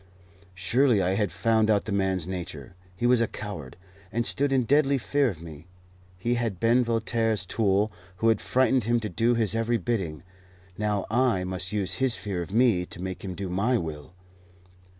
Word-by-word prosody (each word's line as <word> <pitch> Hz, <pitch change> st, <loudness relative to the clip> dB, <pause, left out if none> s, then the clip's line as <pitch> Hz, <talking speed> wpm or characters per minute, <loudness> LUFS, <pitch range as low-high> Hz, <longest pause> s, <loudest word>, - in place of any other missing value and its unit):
Surely 115 Hz, +6 st, +3 dB
I 95 Hz, -1 st, +1 dB
had 100 Hz, -1 st, 0 dB
found 110 Hz, +4 st, +2 dB
out 105 Hz, -2 st, +2 dB
the 110 Hz, -, -4 dB
man's 95 Hz, -3 st, 0 dB
nature. 85 Hz, -7 st, -6 dB, 0.2 s
He 120 Hz, -, -2 dB
was 120 Hz, -1 st, +4 dB
a 115 Hz, -, +2 dB
coward, 85 Hz, -, -7 dB, 0.3 s
and 120 Hz, 0 st, -1 dB
stood 140 Hz, +3 st, +1 dB
in 130 Hz, -2 st, +3 dB
deadly 140 Hz, +3 st, +3 dB
fear 140 Hz, +2 st, +1 dB
of 85 Hz, -6 st, -8 dB
me. 80 Hz, 0 st, -11 dB, 0.5 s
He 120 Hz, +7 st, 0 dB
had 115 Hz, -6 st, -2 dB
been 120 Hz, +2 st, +4 dB
Voltaire's 115 Hz, -3 st, 0 dB
tool, 105 Hz, +1 st, +1 dB, 0.2 s
who 115 Hz, +4 st, +2 dB
had 110 Hz, -, +2 dB
frightened 130 Hz, -2 st, +2 dB
him 120 Hz, +1 st, +2 dB
to 110 Hz, -, -3 dB
do 115 Hz, +6 st, +2 dB
his 110 Hz, -3 st, +1 dB
every 115 Hz, +1 st, +1 dB
bidding. 90 Hz, -8 st, -3 dB, 0.5 s
Now 105 Hz, -1 st, -1 dB
I 120 Hz, -6 st, +2 dB
must 95 Hz, 0 st, -3 dB
use 100 Hz, -3 st, -1 dB
his 130 Hz, -3 st, +3 dB
fear 95 Hz, -4 st, -4 dB
of 85 Hz, -, -6 dB
me 110 Hz, -4 st, +3 dB
to -, -, -9 dB
make 95 Hz, 0 st, -5 dB
him 95 Hz, -2 st, -5 dB
do 100 Hz, 0 st, -4 dB
my 100 Hz, +8 st, +1 dB
will. 80 Hz, -2 st, -6 dB
105 Hz, 190 wpm, -26 LUFS, 95-120 Hz, 0.5 s, was